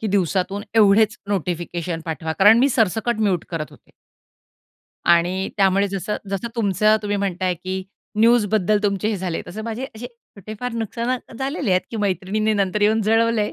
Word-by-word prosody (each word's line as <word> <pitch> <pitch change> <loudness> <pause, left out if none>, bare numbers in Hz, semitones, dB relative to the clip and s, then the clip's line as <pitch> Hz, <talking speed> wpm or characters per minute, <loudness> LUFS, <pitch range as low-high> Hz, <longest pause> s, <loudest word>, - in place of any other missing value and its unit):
की 220 - -2
दिवसातून 195 0 0
एवढेच 215 0 +5
नोटिफिकेशन 175 -3 -3
पाठवा, 160 0 -3
कारण 205 +6 +6
मी 265 +3 +4
सरसकट 225 -1 0
म्यूट 195 -6 +1
करत 165 -3 -4
होते. - - -20 1.1
आणि 175 +3 +2
त्यामुळे 195 0 +3
जसं 200 +2 -3
जसं 200 +4 -3
तुमचं, 215 0 +3
तुम्ही 205 0 -1
म्हणताय, 185 -2 -1
की 185 +2 -5 0.4
न्यूजबद्दल 215 -3 +3
तुमचे 200 0 0
हे 215 - -1
झाले, 180 -3 -3
तसं 215 +5 -7
माझे 230 +3 -4
असे 230 +3 -7
छोटे 215 -4 -12
फार 250 -1 -3
नुकसानात 235 +3 -3
झालेले 270 - -2
आहेत, 185 0 +4
की 230 - -5
मैत्रिणींनी 205 +2 0
नंतर 200 0 0
येऊन 220 +1 +3
जळवल 225 +2 +2
आहे, 210 0 0
205 Hz, 165 wpm, -21 LUFS, 185-220 Hz, 1.1 s, कारण